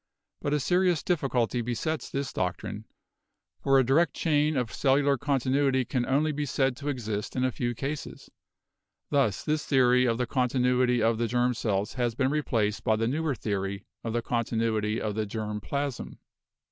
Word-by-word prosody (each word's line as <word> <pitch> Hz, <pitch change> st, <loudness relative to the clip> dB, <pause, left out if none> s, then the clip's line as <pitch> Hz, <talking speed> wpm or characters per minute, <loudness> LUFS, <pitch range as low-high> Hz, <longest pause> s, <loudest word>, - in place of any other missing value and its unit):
But 145 Hz, -, 0 dB
a -, -, +1 dB
serious 180 Hz, +2 st, +2 dB
difficulty 130 Hz, -8 st, 0 dB
besets 125 Hz, +7 st, -3 dB
this 140 Hz, 0 st, -3 dB
doctrine, 90 Hz, -1 st, -3 dB, 0.8 s
for 135 Hz, 0 st, +4 dB
a 135 Hz, -, +5 dB
direct 145 Hz, +7 st, +2 dB
chain 150 Hz, -2 st, +1 dB
of 120 Hz, -5 st, -2 dB
cellular 140 Hz, +3 st, +3 dB
continuity 135 Hz, -1 st, +1 dB
can 125 Hz, 0 st, -1 dB
only 150 Hz, +4 st, +2 dB
be 145 Hz, 0 st, -3 dB
said 135 Hz, 0 st, +1 dB
to 145 Hz, +1 st, -4 dB
exist 110 Hz, -6 st, -3 dB
in 130 Hz, -, 0 dB
a 130 Hz, -, +2 dB
few 120 Hz, 0 st, -2 dB
cases. 140 Hz, +4 st, -5 dB, 0.8 s
Thus 135 Hz, -9 st, +1 dB
this 155 Hz, 0 st, 0 dB
theory 125 Hz, -2 st, +4 dB
of 115 Hz, -2 st, +1 dB
the 125 Hz, -, 0 dB
continuity 125 Hz, -1 st, +2 dB
of 115 Hz, 0 st, +2 dB
the 120 Hz, -, +1 dB
germ 125 Hz, +2 st, +1 dB
cells 105 Hz, -3 st, -1 dB
has 120 Hz, -3 st, -1 dB
been 130 Hz, +1 st, +1 dB
replaced 115 Hz, -8 st, 0 dB
by 110 Hz, -, +3 dB
the 115 Hz, +1 st, 0 dB
newer 150 Hz, +2 st, 0 dB
theory 100 Hz, -2 st, -3 dB, 0.2 s
of 115 Hz, -, -3 dB
the 120 Hz, 0 st, -1 dB
continuity 115 Hz, -2 st, 0 dB
of 105 Hz, -1 st, -2 dB
the 110 Hz, 0 st, -2 dB
germ 105 Hz, 0 st, -4 dB
plasm. 140 Hz, +2 st, -4 dB
125 Hz, 170 wpm, -28 LUFS, 115-140 Hz, 0.8 s, a